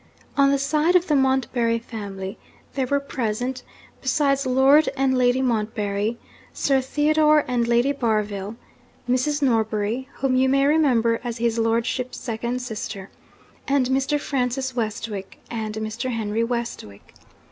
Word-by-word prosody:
On 280 -1 +5
the 280 - +3
side 300 +5 +1
of 360 -1 +4
the 300 - +1
Montbarry 260 -3 +1
family, 200 -4 -7 0.3
there 265 -2 -1
were 280 +2 +1
present, 250 -1 -3 0.4
besides 275 0 +1
Lord 270 +4 +5
and 265 -1 +2
Lady 250 +1 +2
Montbarry, 215 -2 -1 0.4
Sir 270 -2 +2
Theodore 300 +2 +3
and 240 -2 0
Lady 240 +3 +3
Barville; 215 -5 -1 0.5
Mrs. 285 +4 +1
Norbury 225 +1 0
(whom 265 -1 0
you 260 +1 +3
may 275 +1 +3
remember 255 -7 +3
as 240 -1 -4
his 230 0 0
lordship's 235 +3 -1
second 240 +1 -3
sister); 210 -4 -6 0.6
and 275 -2 +2
Mr. 270 +3 +1
Francis 260 -2 -2
Westwick, 215 -3 -4
and 220 -2 -4
Mr. 220 +4 -3
Henry 225 -1 -1
Westwick. 230 - -5
250 Hz, 135 wpm, -23 LUFS, 225-270 Hz, 0.6 s, On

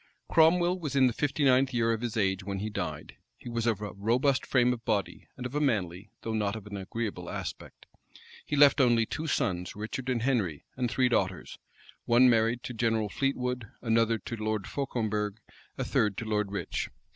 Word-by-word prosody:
Cromwell 175 +3 +4
was 150 -5 -4
in 135 -1 +5
the 125 - +2
fifty 145 +3 -1
ninth 130 0 +4
year 115 -1 +2
of 110 - -3
his 120 -2 -3
age 95 -2 +1
when 100 0 -4
he 105 +2 -3
died. 80 -6 -5 0.2
He - - -9
was 115 0 -1
of 110 -3 +1
a 105 -3 -5
robust 125 +7 +1
frame 125 -1 +3
of 120 -1 -8
body, 105 -4 -2
and 125 - -6
of 125 - -5
a 150 - 0
manly, 100 - -1
though 115 - -3
not 105 -1 0
of 110 -2 -8
an 105 -1 -7
agreeable 100 -2 -4
aspect. - - -7 0.6
He 150 - -3
left 145 -1 +6
only 120 -3 +4
two 155 +8 -4
sons, 90 - -1
Richard 110 +5 -5
and 120 -3 0
Henry; 105 - 0
and 125 -2 -1
three 130 +2 +2
daughters; 95 -6 -1 0.5
one 125 +2 +6
married 115 +1 +2
to 125 - -5
General 115 -2 0
Fleetwood, 125 -1 -1 0.2
another 115 -1 +2
to 115 - -6
Lord 110 -2 -2
Fauconberg, 110 -7 -2 0.4
a - - -1
third 105 -2 +1
to 115 - -4
Lord 105 -2 -1
Rich. 100 - -3
115 Hz, 195 wpm, -29 LUFS, 105-125 Hz, 0.6 s, left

